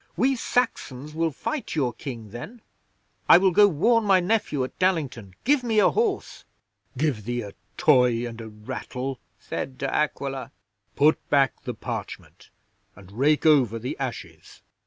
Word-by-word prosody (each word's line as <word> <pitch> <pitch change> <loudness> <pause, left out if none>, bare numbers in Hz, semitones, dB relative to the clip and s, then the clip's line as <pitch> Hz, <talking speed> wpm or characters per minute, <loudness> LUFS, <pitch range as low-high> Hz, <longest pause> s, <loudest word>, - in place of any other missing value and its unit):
"We 265 +7 +3
Saxons 150 - -2
will 165 +1 0
fight 265 - -4
your 130 -6 0
King 115 -4 -8
then. 210 - -9 0.7
I - - +10
will 190 +1 +3
go 205 +4 +6
warn 220 +7 +2
my 195 -3 +4
nephew 180 -8 0
at 130 - -7
Dallington. 140 - -1
Give 280 0 +3
me 225 -3 0
a 210 - +5
horse!" 430 -3 -1 0.5
'"Give 135 -7 0
thee 120 +2 -3
a 100 - -8 0.3
toy 125 -5 +4
and 115 -1 -7
a 110 - -8
rattle," 125 +5 -6 0.2
said 130 -1 -6
De - - -3
Aquila. 135 -2 -2 0.4
"Put 150 +2 +2
back 135 -3 +2
the - - -4
parchment, - - -7 0.5
and 95 -1 -15
rake 145 +9 +2
over 130 -8 +4
the 120 +3 -4
ashes. - - -7
145 Hz, 155 wpm, -25 LUFS, 120-190 Hz, 0.7 s, I